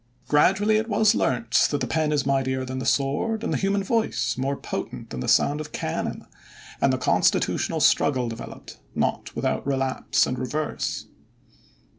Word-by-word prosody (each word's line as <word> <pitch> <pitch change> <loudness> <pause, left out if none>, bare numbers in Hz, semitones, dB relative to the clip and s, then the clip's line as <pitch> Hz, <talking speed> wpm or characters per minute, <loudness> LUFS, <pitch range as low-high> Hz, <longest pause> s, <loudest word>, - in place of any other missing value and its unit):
Gradually 195 +8 +3
it 220 +2 -2
was 215 +1 +4
learnt 115 - +2
that 145 - -1
the - - -1
pen 155 -2 0
is 145 -2 +1
mightier 130 -1 0
than 130 0 -4
the - - -3
sword 150 +12 0
and - - -1
the - - +1
human 195 0 0
voice 225 +2 0
more 135 +2 -1
potent - - -6
than 65 - -5
the - - -4
sound 150 +2 +3
of 150 - -9
cannon 80 - -3 0.6
and 135 - +4
the 130 - +1
constitutional 125 - +1
struggle 130 -4 +3
developed, 115 0 -9 0.2
not - - -1
without - - -1
relapse 135 -1 +1
and 125 -1 -3
reverse. 145 +5 -3
140 Hz, 165 wpm, -24 LUFS, 130-195 Hz, 0.6 s, was